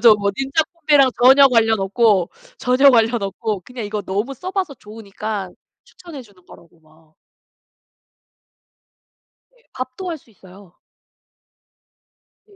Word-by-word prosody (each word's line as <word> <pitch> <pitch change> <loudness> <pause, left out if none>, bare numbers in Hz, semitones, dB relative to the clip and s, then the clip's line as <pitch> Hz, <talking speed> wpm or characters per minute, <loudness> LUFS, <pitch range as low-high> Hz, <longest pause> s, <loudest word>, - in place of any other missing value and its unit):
저 230 -2 +7
뭐 200 -1 -1
닌자 270 +4 0
콤비랑 295 -6 +3
전혀 270 +2 +7
관련 225 -3 +2
없고, 195 -2 +1 0.3
전혀 260 +2 +4
관련 230 -2 +2
없고 200 0 -4
그냥 245 +3 -9
이거 205 0 -5
너무 205 +8 -4
써 365 +9 -7
봐서 375 -7 -3
좋으니까 210 -2 -7 0.3
추천해 335 -6 -12
주는 200 -6 -23
거라고 170 -2 -19
막 155 0 -27 2.4
예. 485 - -31
밥도 260 +8 -6
할 325 - -5
수 255 - -26
있어요. 190 -3 -18 1.7
네. 410 - -23
225 Hz, 240 characters per minute, -19 LUFS, 200-270 Hz, 2.4 s, 저